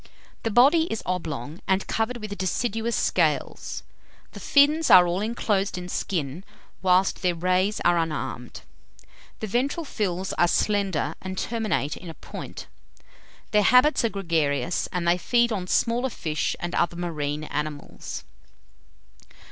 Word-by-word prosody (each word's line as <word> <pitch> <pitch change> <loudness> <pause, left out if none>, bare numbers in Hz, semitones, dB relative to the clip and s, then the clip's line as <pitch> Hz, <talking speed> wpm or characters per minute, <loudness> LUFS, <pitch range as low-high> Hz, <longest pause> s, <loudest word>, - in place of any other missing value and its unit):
The 225 - -1
body 280 +9 +4
is 225 - -3
oblong, 160 -4 -4
and 190 0 +1
covered 225 +2 -1
with 215 -3 -6
deciduous 225 +4 -1
scales. - - 0 0.5
The - - -10
fins 300 +3 +4
are 180 -1 +9
all 175 +2 -1
inclosed 205 -3 -1
in 180 0 -6
skin, 165 -3 -3 0.4
whilst 185 0 +3
their 180 -2 +1
rays 185 +4 +1
are 175 -1 +3
unarmed. 160 -2 -4 0.8
The - - -1
ventral 270 - -1
fins 190 -7 -2
are 175 - +5
slender, 195 -6 0
and 190 0 -6
terminate 215 - -1
in 180 - -9
a 165 - -8
point. - - -8 0.9
Their 210 - +4
habits 250 +7 +5
are 230 - +2
gregarious, 165 -6 0
and 175 -1 -2
they 175 +1 +3
feed 235 +5 +2
on 190 -4 -2
smaller 240 +6 +1
fish 155 -9 -2
and 175 0 -4
other 170 - +1
marine 155 -4 -3
animals. 150 -1 -5
185 Hz, 140 wpm, -25 LUFS, 170-225 Hz, 0.9 s, are